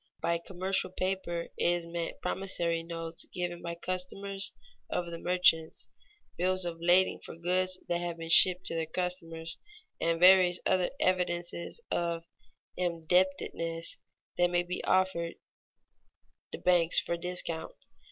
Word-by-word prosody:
_ - - -64
By 170 0 +1
commercial 190 +2 0
paper 185 -2 -2
is 175 0 +1
meant 170 0 -5
promissory 175 -3 0
notes 165 0 -4
given 175 -1 -3
by 170 0 -4
customers 195 +2 -2 0.4
of 175 -1 -2
the 170 - -6
merchants, 175 -3 +2 0.5
bills 185 +1 +1
of 165 -1 -4
lading 180 +2 +4
for - - -10
goods 185 +2 0
that 175 - 0
have 175 -1 -3
been 165 0 -4
shipped 180 +1 +7
to - - 0
their 165 -1 -2
customers, 165 -1 -3 0.4
and 165 0 +1
various 180 -1 +7
other 185 -1 +2
evidences 175 - -1
of 170 -1 -1 0.5
indebtedness 170 -1 0 0.4
that 175 0 +4
may 175 0 +1
be 180 +1 -5
offered 185 -3 +1 1.2
the - - -4
banks 175 -2 +4
for 170 - -2
discount. 170 -1 -2
175 Hz, 130 wpm, -30 LUFS, 170-185 Hz, 1.2 s, shipped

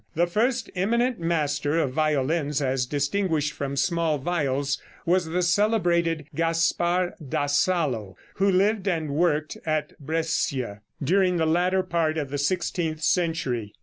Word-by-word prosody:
The 170 +2 +3
first 230 +6 0
eminent 235 +6 +1
master 150 -3 0
of 145 -6 +1
violins, 150 0 +1
as 130 -2 0
distinguished 150 +1 0
from 140 0 -4
small 165 +1 +1
viols, 140 -2 -1 0.2
was 180 +1 +2
the 175 +3 -1
celebrated 175 -5 +2
Gaspar 170 +2 +1 0.2
da 145 - 0
Salo, 145 - 0 0.2
who 195 +1 +3
lived 200 +2 +2
and 160 -5 -1
worked 155 0 0
at 155 -1 -1
Brescia 140 -8 -2 0.2
during 180 +3 +2
the 160 - +2
latter 180 +4 +2
part 165 -3 0
of 145 -4 -3
the 145 - -2
sixteenth 160 0 -1
century. 145 - 0
165 Hz, 135 wpm, -25 LUFS, 145-180 Hz, 0.2 s, The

